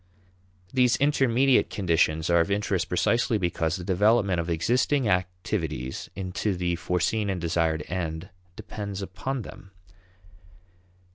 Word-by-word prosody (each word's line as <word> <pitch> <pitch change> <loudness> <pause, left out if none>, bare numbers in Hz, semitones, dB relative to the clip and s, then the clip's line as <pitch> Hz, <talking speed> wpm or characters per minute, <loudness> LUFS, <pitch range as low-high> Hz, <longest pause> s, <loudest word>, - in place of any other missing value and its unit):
These 125 -2 +4
intermediate 135 -2 +3
conditions 80 -4 +1
are 85 - +5
of 85 - +1
interest 100 -3 -1
precisely 115 +5 +1
because 85 -3 -1
the 90 - -6
development 100 0 +2
of 85 0 -3
existing 120 - +1
activities 90 - -2
into 95 +1 -2
the 90 -1 -1
foreseen 100 +5 0
and 95 -2 -2
desired 80 -2 0
end 85 0 -4 0.3
depends 100 -1 -6
upon 125 +7 -4
them. 95 - -12
95 Hz, 120 wpm, -26 LUFS, 85-110 Hz, 0.3 s, are